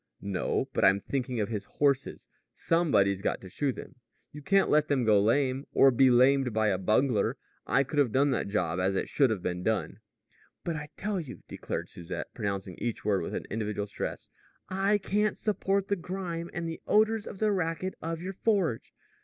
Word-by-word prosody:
"No; 100 -2 -1
but - - 0
I'm 95 +1 +5
thinking 125 0 -3
of 105 - -1
his 105 -3 -4
horses. 140 -2 0 0.3
Somebody's 105 - +2
got - - -1
to 95 - -10
shoe 140 +8 -1
them. 130 - -10 0.3
You 150 - -9
can't 195 +7 +3
let 150 0 +4
them 135 -4 +1
go 105 -2 +5
lame 130 +5 +1
or 135 - +7
be 130 +2 +5
lamed 130 0 +4
by 110 0 +2
a 95 -2 0
bungler. 110 +3 +1 0.3
I 135 - +3
could 145 +2 -2
have 135 -6 +3
done 140 +3 +3
that 125 - -1
job 90 -4 -1
as 95 +1 +1
it - - -1
should 135 -3 +3
have 105 -5 -2
been 90 0 -2
done." 110 +3 -1 0.6
"But 170 - -2
I 150 -1 -6
tell 205 -1 -2
you," 145 -7 -8
declared - - -5
Susette, 85 +1 -7
pronouncing 100 -5 -4
each 120 -4 -3
word 100 -3 +2
with 80 - -4
an - - -4
individual 105 -1 -2
stress, 100 - -5 0.4
"I 195 +2 +2
can't 205 +1 0
support 200 -2 0
the 200 - +1
grime 175 -2 -5
and 170 -1 -4
the 165 - -6
odors 215 0 +3
and 200 - -7
the 215 +1 +2
racket 185 0 -1
of 165 +1 -4
your 190 +1 -4
forge. 190 - 0
135 Hz, 195 wpm, -29 LUFS, 105-175 Hz, 0.6 s, or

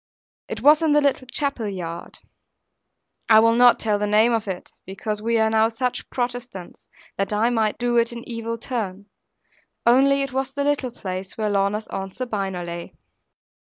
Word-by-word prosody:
It - - -5
was 300 +2 +6
in 315 -2 +3
the 295 - +5
little 280 -3 0
chapel 265 -5 -1
yard; 170 -4 -7 1.1
I 220 -1 +8
will 230 +1 +5
not 245 +1 +6
tell 210 -2 0
the 210 - 0
name 215 +3 +4
of 225 -2 -1
it; 185 -2 -6
because 210 +2 -5
we 230 +1 +1
are 220 0 +3
now 220 0 +3
such 245 +2 -3
Protestants, 245 -6 -5 0.3
that 195 +1 -1
I 220 +3 +2
might 220 -3 0
do 240 0 0
it 235 0 +2
an 235 0 -8
evil 230 -1 -4
turn; 210 -5 -4 0.8
only 275 +3 +4
it 270 -2 -5
was 265 0 -2
the 285 - 0
little 285 -3 0
place 190 -4 -6
where 215 -2 -1
Lorna's 200 +2 0
Aunt 195 -1 -5
Sabina 195 -7 -3
lay. 170 0 -7
225 Hz, 175 wpm, -23 LUFS, 205-250 Hz, 1.1 s, I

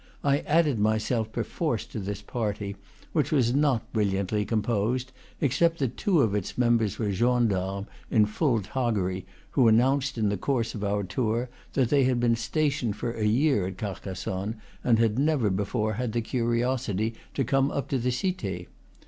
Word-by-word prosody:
I 140 0 +3
added 150 -6 +2
myself 110 +1 +1
perforce - - -2
to - - -6
this 100 +1 -5
party, 105 -3 -3 0.4
which - - +1
was 125 -5 +3
not 140 -5 +1
brilliantly 105 -1 0
composed, 115 +4 0 0.3
except 165 +5 +2
that 130 -5 -1
two 180 -7 +2
of 110 -5 +2
its 105 -3 -3
members 115 -4 +2
were 105 -3 -1
gendarmes 100 -4 +1 0.2
in 105 -2 +4
full 115 +1 +1
toggery, 100 -5 -1 0.2
who 125 - +4
announced 130 +4 +3
in 110 -2 +2
the 100 - -1
course 115 +1 -1
of 105 - -5
our 100 0 0
tour 115 +5 -1 0.2
that 130 -4 +2
they 140 -1 +4
had 125 -1 +2
been 120 -1 +3
stationed 130 -1 0
for 115 +2 -3
a 110 -2 -2
year 120 -3 +2
at 95 -1 -6
Carcassonne, 95 +1 -4 0.3
and 115 -2 +4
had 115 +1 +2
never 140 -8 +2
before 105 +3 -1
had 115 +1 -2
the 120 - +1
curiosity 115 -2 0 0.2
to 135 - +1
come 135 +2 +2
up 140 - -3
to 135 - 0
the 125 +2 0
Cite. 115 - -3
115 Hz, 170 wpm, -27 LUFS, 105-130 Hz, 0.4 s, in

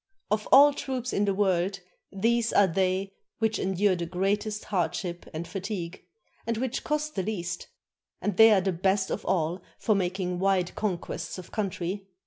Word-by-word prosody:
Of 210 0 0
all 285 +2 +8
troops 255 -3 -3
in 205 - +2
the 200 - +1
world 190 -1 +1 0.3
these 230 +3 +1
are 205 - +5
they 190 +2 0 0.2
which 220 -1 0
endure 190 +1 +2
the 170 -1 -3
greatest 205 +4 -1
hardship 175 -2 -2
and 165 +1 -5
fatigue, 190 -3 -5 0.4
and 230 -1 0
which 255 +1 -2
cost 300 0 -1
the 190 - -1
least; 180 -3 -4 0.5
and 205 - -1
they 225 +3 +8
are 205 -3 +5
the 190 +1 0
best 190 +2 +1
of - - -3
all 175 -1 0 0.2
for 215 - +2
making 180 -2 -1
wide 190 -2 +1
con 200 -5 -1
quests 170 - -6
of 185 - -10
country. 195 -1 -3
195 Hz, 170 wpm, -27 LUFS, 180-215 Hz, 0.5 s, all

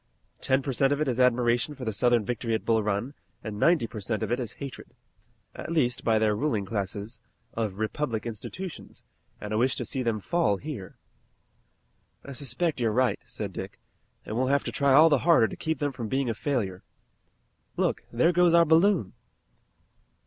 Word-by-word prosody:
Ten 135 0 +1
per 135 - -2
cent 135 +2 +2
of 145 - +1
it 155 - 0
is 125 -1 -1
admiration 125 +2 +2
for 130 -2 -7
the 110 - -1
Southern 120 0 +2
victory 115 -1 -1
at - - -4
Bull 110 -1 +3
Run, 105 +6 -2 0.3
and 105 -2 -5
ninety 165 -4 +4
per 110 - -7
cent 105 +1 -2
of - - -3
it 120 - +1
is 120 -3 -4
hatred 140 -3 -9 0.6
at - - -7
least 125 -7 +1
by 115 -1 +3
their 110 -1 +2
ruling 110 -4 -1
classes 100 +2 -4 0.3
of 110 -4 -3
republican 115 +1 -2
institutions, 165 - -8 0.4
and 105 0 -5
a 110 - +1
wish 130 +2 +2
to - - -4
see 135 - -3
them 115 -3 0
fall 105 - +1
here." 130 -7 -7 1.3
"I 140 - -8
suspect 140 +4 -1
you're 115 -2 +1
right," 125 -2 +1
said - - -5
Dick, - - -7 0.5
"and 110 - -5
we'll 130 +2 +1
have 140 +1 +2
to - - -4
try 140 -1 +2
all 155 +5 +7
the 145 -3 +3
harder 160 -9 +5
to - - -7
keep 160 -1 -2
them 145 +1 -1
from 120 -4 -5
being 130 +1 0
a - - -2
failure. 110 -8 -2 1.0
Look, - - 0
there 125 +9 +3
goes 175 -1 +4
our 170 0 +6
balloon!" 165 - +3
125 Hz, 190 wpm, -27 LUFS, 110-145 Hz, 1.3 s, all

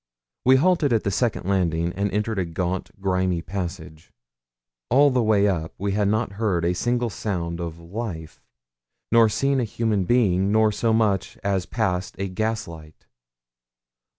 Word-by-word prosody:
We 130 +1 +7
halted 160 -1 +3
at 110 - +1
the 100 - 0
second 115 -1 -1
landing, 85 -3 0
and 100 +1 -1
entered 105 +1 -1
a 90 - 0
gaunt, 90 +2 -3
grimy 95 -3 0
passage. 85 -4 -6 0.8
All 140 +4 +5
the 125 -1 +2
way 105 -2 +3
up 85 -5 -2
we 100 +1 -2
had 100 0 +1
not 110 +1 0
heard 90 -6 +1
a 90 - +2
single 120 +4 -1
sound 85 -5 -3
of 85 -1 -5
life, 85 -2 -7 0.7
nor 115 -1 +6
seen 135 +5 +1
a - - +1
human 110 -3 -1
being, 100 -4 +2
nor 110 0 +4
so 115 +2 0
much 110 -4 +1
as 95 -3 0
passed 95 -4 -2
a 100 - -2
gaslight. 90 -7 -5
100 Hz, 155 wpm, -23 LUFS, 90-110 Hz, 0.8 s, We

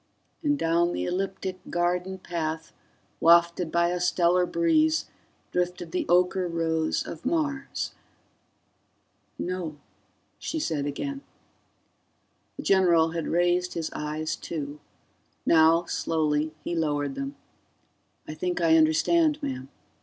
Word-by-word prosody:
And 290 -2 +1
down 170 -1 +2
the - - -2
ecliptic 190 0 -3
garden 180 +2 0
path, 160 -3 -4 0.5
wafted 170 0 +4
by 170 0 +3
a 180 0 -1
stellar 180 0 +3
breeze, 320 - +2 0.5
drifted 180 -1 -2
the 180 - -1
ocher 180 0 +2
rose 160 -1 0
of 160 - -8
Mars... 290 -4 -1 1.5
"No," 175 -4 -3 0.6
she 320 - -3
said 150 - -1
again. 275 - -4 1.4
The - - -6
general 170 -4 +4
had 165 -1 -3
raised 175 +1 +1
his 165 -2 -3
eyes, 155 +1 -3
too; 150 -2 -6 0.7
now, 165 +1 +5
slowly, 155 -2 0
he - - -3
lowered 145 -3 0
them. 135 +1 -5 0.9
"I 155 - -5
think 180 +3 -2
I 165 -1 +5
understand, 295 - +3
ma'am. 130 0 -4
170 Hz, 115 wpm, -27 LUFS, 160-180 Hz, 1.5 s, now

